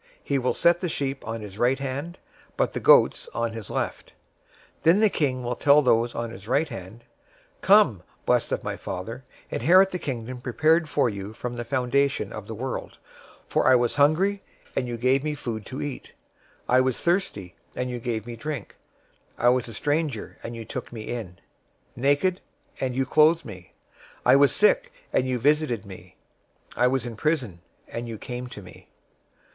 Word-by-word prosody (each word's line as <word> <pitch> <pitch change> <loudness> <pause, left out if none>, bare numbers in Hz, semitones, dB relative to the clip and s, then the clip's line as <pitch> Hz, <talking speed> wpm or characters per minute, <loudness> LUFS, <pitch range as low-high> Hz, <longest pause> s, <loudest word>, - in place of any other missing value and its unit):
025:033 - - -31 0.2
He 140 -1 0
will 125 0 0
set 170 0 +4
the 180 - -2
sheep 135 -4 -3
on 115 0 -4
his 105 0 -9
right 125 +2 +3
hand, 140 +5 -5 0.4
but - - +1
the - - -2
goats - - +5
on 115 0 -1
the 115 -3 -7
left. - - -4 0.6
025:034 - - -38
Then 170 +5 +5
the 215 -1 +5
King 130 -4 0
will 120 0 -2
tell 145 +3 +5
those 120 -1 +2
on 115 -1 -3
his 95 +1 -11
right 145 +6 +1
hand, 115 0 -9 0.6
'Come, - - +5 0.2
blessed - - +2
of - - -1
my - - -3
Father, 110 +7 -6 0.3
inherit 185 +9 +5
the 180 - -3
Kingdom 125 -3 -5
prepared 155 +6 +2
for 130 - +2
you 100 -1 -5
from 120 +2 -5
the 120 - -4
foundation 130 +3 0
of 105 -1 -7
the 110 - -6
world; 130 +4 -5 0.5
025:035 - - -36
for - - +2
I 130 - +7
was 120 -1 +1
hungry, 180 +8 +3 0.3
and 125 - 0
you 120 -1 -4
gave 130 +3 +2
me 150 -1 -2
food 110 -6 -5
to 130 - -5
eat; 145 -3 -7 0.5
I 125 +1 +5
was 130 -2 0
thirsty, 170 - -1 0.2
and 125 0 -2
you 120 - -4
gave 115 -3 -3
me 120 -1 -7
drink; 145 -2 -6 0.6
I 120 - +4
was 125 -1 +1
a 115 - -8
stranger, 145 -5 -2
and 115 - -6
you 115 -1 -7
took 125 +3 -6
me 115 -3 -7
in; 105 -7 -5 0.6
025:036 - - -27
naked, 145 +8 +2 0.4
and 130 -2 -2
you 135 0 +1
clothed 155 +4 +4
me; 90 -6 -11 0.5
I - - +7
was 140 0 +5
sick, - - +3 0.2
and 130 - +2
you 130 -1 0
visited 140 -4 +1
me; 90 -2 -12 0.6
I 125 - +3
was 130 -1 0
in 120 -2 -6
prison, 125 - -1 0.3
and 120 +1 -5
you 115 -1 -6
came 125 +3 -6
to 105 -4 -10
me.' 90 - -15
125 Hz, 195 wpm, -25 LUFS, 115-145 Hz, 0.6 s, I